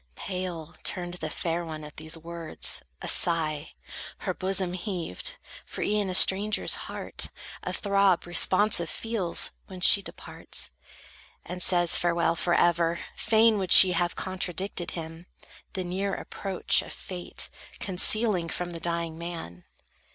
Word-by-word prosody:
Pale 180 -4 -5
turned 175 -2 -1
the 160 -3 -5
fair 170 +2 -3
one 155 -2 -7
at 150 0 -11
these 155 +1 -2
words; 165 0 -1 0.2
a - - -4
sigh 155 -3 +1 0.4
Her - - -3
bosom 190 -1 -1
heaved; 180 - -4 0.3
for - - -6
e'en 205 -2 0
a 185 - -1
stranger's 200 +3 +4
heart - - -4 0.3
A - - -4
throb 200 -3 +2
responsive 175 0 +4
feels, 220 -7 -1 0.2
when 185 -1 -9
she 200 +2 +6
departs, - - -5 0.7
And 180 +1 -6
says 175 -2 +4
farewell 170 -1 +1
forever. 170 0 +2 0.2
Fain 220 -1 +3
would 185 -3 -3
she 185 - +10
Have 175 0 0
contradicted 185 -1 -3
him, 165 +1 -8 0.5
the 185 - -2
near 190 +3 -2
approach 195 -3 0
Of - - -9
fate 180 -2 -4 0.3
concealing 190 -1 +3
from 175 +1 -4
the 170 - -7
dying 170 -1 -3
man. 165 - -8
175 Hz, 135 wpm, -27 LUFS, 165-190 Hz, 0.7 s, she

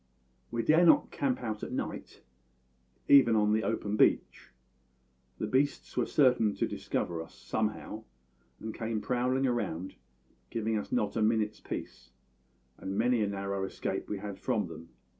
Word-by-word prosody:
"We 115 0 -2
dared 165 +3 +5
not - - +5
camp 130 -3 -1
out 110 -2 -3
at - - -5
night, - - -5 0.8
even 135 -5 +7
on 105 0 +3
the 110 - +2
open 105 -2 -1
beach. - - +2 0.9
The - - -2
beasts 140 +2 0
were - - +1
certain 125 -7 +3
to - - 0
discover 85 -2 -3
us, 80 - -11
somehow, 110 0 -3 0.5
and 110 0 -5
came 110 -1 -2
prowling 125 +4 0
round, 100 -8 -1 0.6
giving 110 -1 -1
us 105 - -3
not 105 - 0
a 115 - 0
minute's 110 -1 +1
peace; 65 -1 -7 0.7
and 95 +1 -4
many 120 -1 +2
a 105 - +2
narrow 100 -1 -3
escape 95 - -4
we 105 - -2
had 100 -1 -7
from - - 0
them. 80 +1 -10
110 Hz, 155 wpm, -30 LUFS, 100-120 Hz, 0.9 s, even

